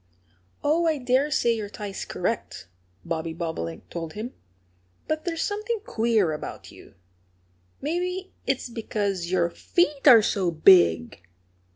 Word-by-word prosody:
"Oh, 330 +3 +2
I 315 -2 +2
dare 260 +2 +1
say 240 -5 +2
your 215 -3 -4
tie's 205 -1 -6
correct," 175 - -3 0.4
Bobby 165 -1 -3
Bobolink 160 - -5
told 165 -2 -5
him. 225 +4 -6 0.7
"But 310 +2 -2
there's 330 -2 -1
something 425 +2 -2
queer 220 -7 +1
about 150 - -7
you. - - -16 0.9
Maybe 360 +5 -3
it's 265 -1 0
because 205 -6 -3
your 175 -2 +1
feet 300 - 0
are 235 -5 +9
so 190 -3 +1
big!" 155 - +5
220 Hz, 130 wpm, -25 LUFS, -, 0.9 s, are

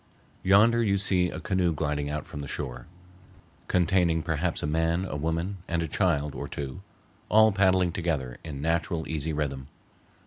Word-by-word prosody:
Yonder 110 +5 +5
you 100 -3 +2
see 90 -2 +2
a - - -6
canoe 90 -3 +1
gliding 75 -2 -2
out 75 +1 -3
from 75 - -8
the 70 - -5
shore, - - -5 0.8
containing 90 -3 +2
perhaps 80 +2 -1
a - - +1
man, 80 +4 +1
a 95 - -5
woman, 80 +6 -2
and 85 0 0
a - - -2
child 75 -4 0
or - - -5
two, 70 -2 -6 0.5
all 110 +1 +6
paddling 95 -2 +3
together 75 -9 -2
in 70 -4 -6
natural, 80 0 0
easy 80 0 -2
rhythm. 70 -3 -3
80 Hz, 165 wpm, -27 LUFS, 75-95 Hz, 0.8 s, all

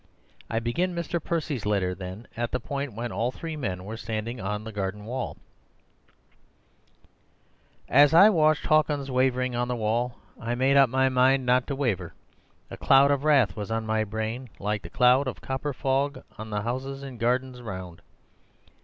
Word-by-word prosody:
I 115 - -1
begin 170 +11 -1
Mr. 170 -1 -3
Percy's 150 -8 -2
letter, 100 -3 0
then, 95 +4 -8
at 120 0 -2
the 125 - -1
point 140 +1 -4
when 115 +2 -4
all 120 +2 -1
three 160 +3 -6
men 95 -10 -4
were 110 +2 -6
standing 115 +2 -4
on 105 +2 -3
the 110 - -7
garden 100 0 -4
wall:— 125 +2 -4 2.5
"As 145 +2 +6
I 175 +5 +8
watched 155 -4 +3
Hawkins 150 -3 +2
wavering 130 -1 +1
on 120 0 0
the 125 - -1
wall, 120 +2 -1 0.2
I 115 +1 -2
made 135 +3 +2
up 135 -2 +6
my 130 +2 +2
own 130 - +1
mind 130 +1 +3
not 125 0 +2
to 140 - -2
waver. 125 -9 -2 0.6
A - - -7
cloud 140 +1 +5
of 140 -1 0
wrath 135 -11 +4
was 105 -1 -5
on 115 0 -2
my 110 0 +1
brain, 110 +4 -4
like 105 +1 -2
the 85 - -9
cloud 125 +7 +4
of 130 - -4
copper 135 +2 -3
fog 135 +2 -1
on 110 +1 -8
the 105 -1 -2
houses 135 +4 -4
and 130 -4 -8
gardens 125 +1 0
round. 95 -6 -7
125 Hz, 180 wpm, -26 LUFS, 110-135 Hz, 2.5 s, I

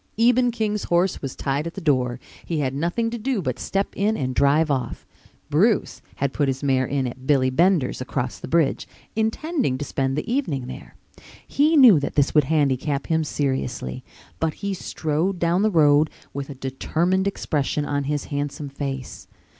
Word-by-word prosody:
Eben 245 +2 +4
King's 215 -3 -2
horse 175 +2 +1
was 135 -2 -5
tied 140 +4 -2
at 170 - -7
the - - -4
door. 130 -7 +1 0.2
He 165 - -3
had 135 -3 -1
nothing 175 +11 -1
to 235 - -4
do 250 0 -1
but 130 -8 -3
step 195 0 -1
in 210 +2 +1
and 130 -2 -2
drive 145 +4 +3
off. 130 -3 -3 0.5
Bruce - - +2
had 140 -1 -1
put 145 - +1
his 135 +1 -2
mare 130 -2 +2
in 135 -1 -1
at 130 +2 -7
Billy 130 -3 +3
Bender's 165 -3 +2
across 130 -1 -3
the - - -7
bridge, 165 -4 +1 0.3
intending 225 - 0
to 145 - -4
spend 135 -1 -1
the 150 - -3
evening 230 - -1
there. 130 - -9 0.5
He 305 +3 +3
knew 240 - +8
that 140 - -4
this 145 -1 +2
would 150 -3 +4
handicap 140 -1 0
him 160 0 +2
seriously, 130 - -2 0.4
but 160 -1 -1
he 200 0 -3
strode 170 +1 -2
down 170 +2 +1
the 215 - +3
road 150 -4 +4 0.2
with 140 0 -5
a 140 - -7
determined 165 +8 0
expression 150 -6 -1
on 145 -1 -1
his 145 0 -1
handsome 145 0 -3
face. 135 -8 -6
150 Hz, 180 wpm, -23 LUFS, 135-190 Hz, 0.5 s, knew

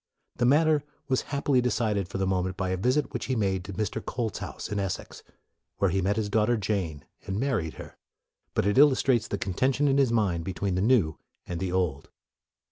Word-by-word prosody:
The 120 - +2
matter 150 +1 +4 0.2
was 130 -2 +1
happily 140 -2 +2
decided 110 -6 0
for 95 - -5
the 95 - 0
moment 95 0 -1
by 95 -1 -1
a 95 - 0
visit 125 +8 0
which - - -3
he 130 - -1
made 95 -4 0
to 100 - -6
Mr. 110 +2 -3
Colt's 115 -5 -3
house, - - -6
in 105 - -2
Essex, 95 -2 -4 0.6
where 100 -3 +2
he 95 +2 +1
met 100 +3 +1
his 110 -2 -1
daughter 110 +3 +2
Jane 95 -8 -2 0.2
and 95 +2 -2
married 115 - -1
her. - - -10 0.6
But - - +1
it 105 +5 +3
illustrates 135 -4 +4
the 100 - -2
contention 130 +10 +1
in 140 0 +3
his 135 -4 +3
mind 95 -7 +1
be 95 - -4
tween 100 0 -1
the 90 - 0
new 100 - +3 0.3
and 85 -1 -4
the 95 -1 -2
old. 90 -7 -1
105 Hz, 210 wpm, -27 LUFS, 95-125 Hz, 0.6 s, matter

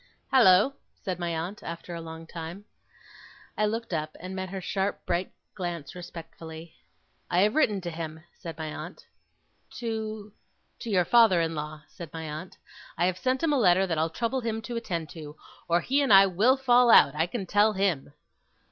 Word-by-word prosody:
'Hallo!' 225 -1 +6 0.2
said 185 -3 -5
my 175 -1 -2
aunt, 170 +5 -4
after 170 +1 -7
a 170 - -5
long 160 0 -9
time. 170 +4 -8 0.9
I 215 - +2
looked 225 -2 -3
up, 155 -1 -3
and 185 +2 -7
met 190 0 -4
her 190 +1 -5
sharp 195 +2 -2
bright 175 +1 -1 0.2
glance 175 -5 -5
respectfully. 165 -2 -10 0.6
'I 175 - +2
have 210 +2 +3
written 215 -10 +2
to 175 -1 -4
him,' 160 -1 -6
said 165 -1 -9
my 155 -1 -5
aunt. - - -9 0.7
'To 220 -3 -4 0.2
?' - - -44
'To 235 - -6
your 185 -4 +3
father 225 -6 +5
in 165 0 0
law,' 150 0 -6
said 165 -1 -10
my 160 0 -6
aunt. 160 +5 -7 0.4
'I 175 - +2
have 185 0 0
sent 260 - 0
him 315 -2 +3
a 280 - +2
letter 185 -3 +4
that 165 -4 -1
I'll 160 +1 +1
trouble 235 +9 -2
him 225 -1 -2
to 240 +1 -5
attend 170 -9 -3
to, 150 -2 -9 0.3
or 170 +1 +3
he 275 - +1
and 275 - +1
I 195 0 +9
will 210 +9 +3
fall 250 -2 +4
out, 140 - +7
I 160 +3 0
can 200 +1 -4
tell 205 +4 +3
him! 190 -8 0
180 Hz, 190 wpm, -27 LUFS, 165-215 Hz, 0.9 s, I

